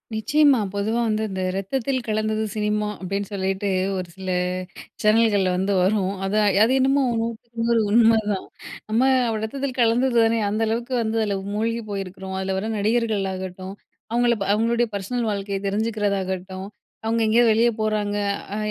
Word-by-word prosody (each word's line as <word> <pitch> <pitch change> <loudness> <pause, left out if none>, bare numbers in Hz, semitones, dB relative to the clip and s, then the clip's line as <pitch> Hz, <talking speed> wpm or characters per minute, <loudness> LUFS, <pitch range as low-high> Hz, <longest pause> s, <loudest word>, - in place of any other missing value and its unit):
நிச்சயமா. 285 +3 +4
பொதுவா 215 +3 -1
வந்து 215 0 0
இந்த 190 -1 -4
"ரத்தத்தில் 255 +6 -2
கலந்தது 215 0 0
சினிமா" 210 0 -1
அப்டீன்னு 195 +1 -3
சொல்லிட்டு 195 0 -1 0.3
ஒரு 185 -1 -3
சில 190 -1 -6 0.7
சேனல்கள்ல 215 -3 +3
வந்து 190 +2 0
வரும். 190 0 +1
அத 195 +2 -1 0.3
அது 240 - +3
என்னமோ 270 +1 +3 0.2
100க்கு 230 0 -5
100 235 -1 +3
உண்மதான். 220 -3 +3 0.4
நம்ம 220 +3 +2 0.3
அப்டி 220 -1 -2
ரத்தத்தில் 265 +3 -3
கலந்தது 240 +2 +2
தானே! 225 0 +2
அந்த 215 +2 -1
அளவுக்கு 235 +3 -2
வந்து 225 0 -1
அதில 205 -2 0 0.2
மூழ்கி 230 +2 -1
போயிருக்குறோம். 190 -1 -5
அதுல 190 0 -2
வர 210 +3 -2
நடிகர்களாகட்டும், 195 -4 -1 0.4
அவுங்கள 240 0 +3
ப - - +2
அவுங்களுடைய 235 +2 +1
பர்ஸ்னல் 225 +4 -2
வாழ்க்கைய 200 -1 -2
தெரிஞ்சுக்கிறதாகட்டும், 195 -3 -2 0.4
அவுங்க 230 +1 +1
எங்கேயோ 235 +2 +4
வெளிய 230 +2 +4
போறாங்க. 210 -1 0 0.4
அ - - -2
215 Hz, 145 wpm, -23 LUFS, 195-230 Hz, 0.7 s, நிச்சயமா